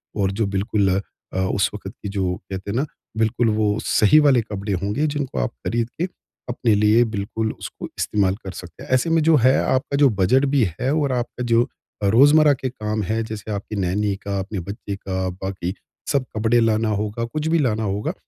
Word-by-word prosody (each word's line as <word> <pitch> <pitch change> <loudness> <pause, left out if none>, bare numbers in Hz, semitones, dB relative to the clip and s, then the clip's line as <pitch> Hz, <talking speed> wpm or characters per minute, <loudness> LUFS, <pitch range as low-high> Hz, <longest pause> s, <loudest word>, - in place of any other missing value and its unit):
और 95 -2 +1
जो 110 - +3
बिल्कुल 100 0 +1 0.4
अ, 95 - -1
उस 95 +1 +1
वक़्त 95 -2 -7
की 100 - -3
जो 90 -2 0 0.2
कहते 95 +1 -4
हैं - - -3
ना, 140 - +1 0.3
बिल्कुल 115 +1 +2
वो 105 0 +1
सही 110 +9 +5
वाले 130 -4 +5
कपड़े 105 -2 -4
होंगे 105 +10 0
जिनको 140 - -2
आप - - 0 0.2
ख़रीद 115 0 0
के 175 - +2 0.4
अपने 120 -2 +1
लिए 105 +3 +5
बिल्कुल 110 +2 -2
उसको - - -8
इस्तेमाल 100 -3 +1
कर 95 - -4
सकते 90 -2 -10
हैं। - - -12
ऐसे 130 +6 +2
में 165 0 +3
जो 160 0 +5
है 130 +1 +6
आपका 130 +2 0
जो 140 -1 +6
बजट 125 +9 +3
भी 135 - +4 0.2
है 130 +2 0
और 145 -3 +1
आपका 125 0 -3
जो 115 +1 +4 0.4
रोज़मर्रा 145 +8 +6
के 130 -1 -3
काम 110 -3 -3
है 110 +4 -1
जैसे 110 -1 -6
आपकी 105 +1 -4
नैनी 100 +1 0
का, 100 0 -4
अपने 95 +1 -4
बच्चे 100 +2 -6
का, 95 -1 -3
बाकी 95 0 -4 0.4
सब 140 -2 +1
कपडे 115 +2 +3
लाना 110 -1 +2
होगा, 105 +2 -2
कुछ 150 +6 -3
भी 165 +1 +3
लाना 110 -6 +1
होगा 100 0 -2
110 Hz, 200 wpm, -22 LUFS, 100-125 Hz, 0.4 s, है